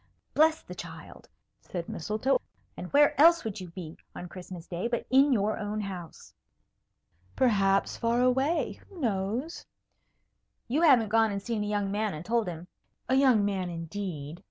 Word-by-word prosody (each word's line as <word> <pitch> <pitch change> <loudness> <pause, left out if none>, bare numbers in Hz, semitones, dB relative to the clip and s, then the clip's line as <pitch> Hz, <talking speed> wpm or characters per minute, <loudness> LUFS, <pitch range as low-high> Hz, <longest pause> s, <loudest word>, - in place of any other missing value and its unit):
"Bless 315 +1 +3
the - - -9
child!" - - -10 0.3
said 175 -2 -6
Mistletoe. 215 - 0 0.3
"And 180 - -8
where 290 +1 +5
else 335 +2 +7
would 215 -4 -5
you 180 - -7
be 165 -2 -9 0.2
on 180 - -7
Christmas 180 -2 -9
day 180 +5 -3
but 240 0 -2
in 275 +2 +5
your 215 -3 +1
own 210 +1 -3
house?" 180 -5 -8 1.0
"Perhaps 195 -5 +2
far 235 +1 +1
away. 265 +6 +1
Who 385 -4 -12
knows?" 230 - -2 1.0
"You 275 +7 0
haven't 255 -10 +5
gone 225 0 +3
and 200 - -2
seen 210 +1 -3
a - - -3
young 205 -1 -1
man 210 -3 -1
and 155 +3 -8
told 230 -2 +1
him 170 0 -6 0.2
" - - -44
"A - - +2
young 260 -6 +4
man, 190 -3 -1
indeed!" 165 -2 -6
210 Hz, 165 wpm, -28 LUFS, 185-255 Hz, 1.0 s, else